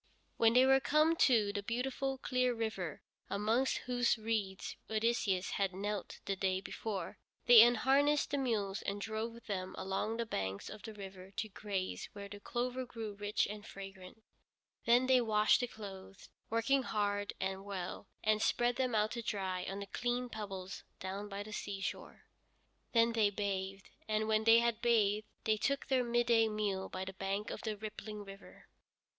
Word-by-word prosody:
When 230 0 +5
they 250 +2 +7
were 270 0 +6
come 305 +4 +3
to 220 -9 +4
the 205 - -2
beautiful, 265 +5 -2
clear 255 -1 +1
river, 205 -9 -3 0.3
amongst 220 +6 +1
whose 245 -1 +2
reeds 215 -4 -2
Odysseus 220 -4 +1
had 195 -2 0
knelt 205 0 -4
the 195 - -1
day 190 0 0
before, 200 +1 -5 0.3
they 240 -2 +10
unharnessed 270 +5 +4
the 285 - +1
mules 210 -6 -1
and 200 +1 -3
drove 225 +2 -4
them 185 -3 -3
along 195 +4 -2
the 235 - -1
banks 95 - -3
of 215 - -9
the 220 -2 -8
river 190 -2 -9
to 220 - -2
graze 195 -2 -4
where 200 -1 -7
the 205 0 -9
clover 250 +4 -2
grew 225 -4 -6
rich 205 +1 0
and 210 +1 -7
fragrant. 195 +2 -10 0.6
Then 240 +2 +5
they 255 -1 +5
washed 215 -2 +4
the 245 - -1
clothes, 195 -4 -10 0.2
working 230 +5 +2
hard 205 -3 -1
and 190 0 -2
well, 190 -3 -5 0.2
and 215 0 +3
spread 240 +1 +2
them 255 -3 +1
out 215 0 +2
to 235 - -3
dry 190 -4 -2
on 195 - -4
the 200 - -5
clean 245 +4 -2
pebbles 195 -4 -6 0.2
down 195 +2 -5
by 200 0 -4
the 215 +1 -9
seashore. 200 -2 -5 0.7
Then 230 0 +4
they 220 -3 +4
bathed, 195 -1 -3 0.2
and 215 0 0
when 220 0 +2
they 230 +1 +8
had 235 -1 0
bathed 215 -3 +3 0.2
they 215 -1 +2
took 275 +5 0
their 260 -2 +3
midday 235 -1 +3
meal 205 -3 -2
by 185 0 -4
the 190 - -6
bank 195 +2 -3
of - - -5
the 215 -2 -3
rippling 215 0 -7
river. 195 0 -12
215 Hz, 170 wpm, -34 LUFS, 195-235 Hz, 0.7 s, they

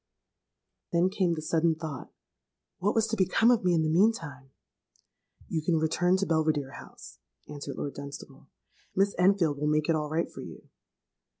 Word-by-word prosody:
"Then 175 +2 +2
came 185 -4 +1
the 155 - -6
sudden 160 +1 +2
thought, 155 -4 -7 0.7
'What 200 +3 0
was 225 -1 +3
to 225 - 0
become 200 +4 +3
of 235 -4 +2
me 180 -1 +3
in 160 - +2
the - - 0
meantime?'—'You 160 -4 -3
can 165 +1 +1
return 175 +4 +2
to 195 - 0
Belvidere 155 -5 0
House,' - - -13 0.3
answered 145 -1 -7
Lord 140 - -4
Dunstable: 140 0 -10 0.5
'Miss 195 +1 +2
Enfield 180 -6 +3
will 150 - 0
make 150 +1 +1
it 165 - +4
all 150 -1 -2
right 160 +2 -1
for - - -9
you.' - - -11
165 Hz, 165 wpm, -28 LUFS, 150-185 Hz, 0.7 s, it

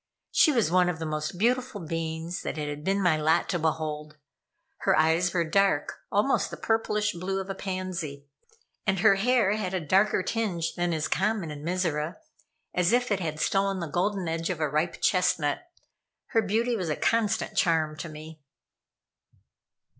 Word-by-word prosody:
She 310 - +5
was 230 - +1
one 180 0 +4
of 175 - -2
the 160 - -4
most 155 +3 -3
beautiful 250 +2 +1
beings 165 0 -4
that - - -4
it 150 -1 -3
had 145 0 -5
been 195 +3 +1
my 165 -4 +4
lot 155 +2 +2
to 175 - 0
behold. 155 -1 -2 0.6
Her - - +2
eyes 165 +3 +3
were 170 -1 +1
dark, 195 -3 +1
almost 210 +7 +2
the - - -7
purplish 210 -2 0
blue 190 +3 -3
of 195 0 -4
a - - -2
pansy, 185 -7 -5 0.6
and 190 -2 +1
her 215 -1 +7
hair 225 +1 +2
had 190 -3 -2
a - - +1
darker 190 +5 +2
tinge 190 -6 -1
than 175 -1 -1
is 155 -2 -1
common 195 -4 0
in 145 0 -8
Mizora, 170 -2 -1 0.6
as 180 0 +2
if 245 -1 +2
it 200 - +2
had 155 -4 -3
stolen 195 +3 +1
the 170 - -2
golden 180 +4 -1
edge 165 +1 -2
of 180 -4 -2
a 155 - +1
ripe 155 +4 -1
chestnut. 180 - +1 0.6
Her 225 - +3
beauty 225 +4 0
was 185 -7 -2
a 150 - 0
constant 225 -1 0
charm 160 -3 +2
to 170 - -6
me. 155 0 -10
180 Hz, 175 wpm, -27 LUFS, 160-200 Hz, 0.6 s, her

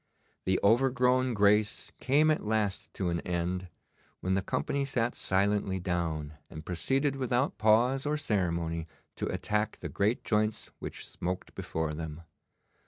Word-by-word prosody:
The 95 0 +2
overgrown 125 +2 +3
grace 105 +1 +3
came 150 +4 +4
at 155 - 0
last 105 -2 -1
to 95 -3 -1
an 85 0 0
end, 90 +1 -2 0.5
when 95 - 0
the 95 - +2
company 140 +8 -1
sat 120 -3 0
silently 100 0 +1
down, 80 -4 -2 0.2
and 80 0 -9
proceeded 135 - 0
without 130 +1 0
pause 120 +6 +4
or 150 +1 +1
ceremony 85 - -1 0.3
to - - -2
attack 105 0 -1
the - - -6
great 105 +4 0
joints 105 0 0
which - - -6
smoked 90 +1 -4
before 80 -1 -3
them. 80 +1 -6
105 Hz, 140 wpm, -30 LUFS, 90-125 Hz, 0.5 s, came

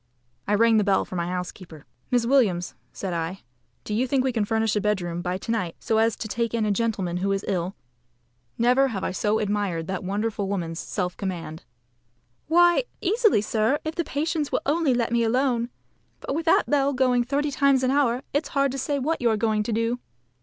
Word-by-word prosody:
I 210 - +3
rang 225 +1 +4
the 210 - +4
bell 195 -1 +2
for - - -8
my 170 -1 -1
housekeeper. 180 -3 -6 0.2
"Miss 245 -2 +2
Williams," 220 -10 +2 0.2
said 190 -3 -4
I, 170 +3 -3 0.4
"do 210 - -5
you 245 +5 +1
think 260 0 +1
we 260 - +1
can 225 -4 0
furnish 220 0 0
a 210 - +1
bedroom 175 -5 -1
by 180 +1 -2
to 210 - -5
night, 185 -8 -1
so 220 -1 +1
as 225 0 +2
to 220 - -5
take 230 +2 -2
in 225 -2 +1
a 210 - +1
gentleman 200 -5 -1
who 195 +2 0
is 195 0 -1
ill?" 185 0 -1 0.8
Never 250 +3 +4
have 205 -7 -4
I - - -1
so 210 +3 0
admired 205 -6 -1
that 190 +1 -4
wonderful 205 +1 -2
woman's 170 -4 -3
self 180 -3 -3
command. 170 -5 -5 0.8
"Why, 345 +7 +4
easily, 430 - +3
sir, 220 +5 +1
if 315 - -2
the 340 - -1
patients 305 0 -2
will - - 0
only 290 -3 +2
let 235 -1 0
me 235 0 +2
alone. 240 0 +1 0.5
But - - -4
with 325 +3 -2
that - - +4
bell 280 -1 +2
going 250 -2 +2
thirty 285 +4 -1
times 275 -1 +3
an 255 - +2
hour, 265 -3 +2
it's 290 0 0
hard 275 -1 +3
to 270 - -4
say 285 +2 -1
what 300 +4 -1
you 240 - +3
are 220 - +1
going 215 0 +1
to 210 - -3
do." 230 +2 0
225 Hz, 210 wpm, -25 LUFS, 195-265 Hz, 0.8 s, rang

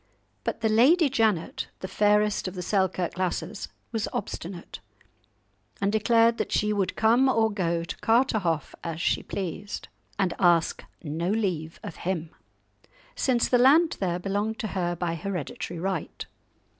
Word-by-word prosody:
But - - -3
the 220 - +2
Lady 280 +9 +5
Janet, 220 -10 0
the 190 - -4
fairest 210 +1 +2
of 185 - -6
the 180 - -4
Selkirk 185 -2 0
lasses, 185 -2 -2 0.2
was 220 -3 -1
obstinate, 175 0 -6 1.0
and 200 0 +1
declared 230 +2 +3
that - - -2
she 210 0 +2
would 200 -3 -1
come 235 +4 +4
or 225 -3 +3
go 170 -4 -1
to 170 - -6
Carterhaugh, 220 - +1
as 165 -1 -4
she - - +1
pleased, 195 +2 -5 0.3
"and 190 -3 +1
ask 170 -2 +3 0.2
no 165 +3 -2
leave 180 -7 -1
of 205 -7 -7
him," 170 -3 -3 0.8
since 245 -3 +2
the 245 - +3
land 310 +7 +5
there 175 -3 0
belonged 205 +4 -2
to 215 - -3
her 175 -2 -1
by 170 -1 -2
hereditary 175 -1 -4
right. 185 -2 -3
195 Hz, 145 wpm, -26 LUFS, 175-220 Hz, 1.0 s, Lady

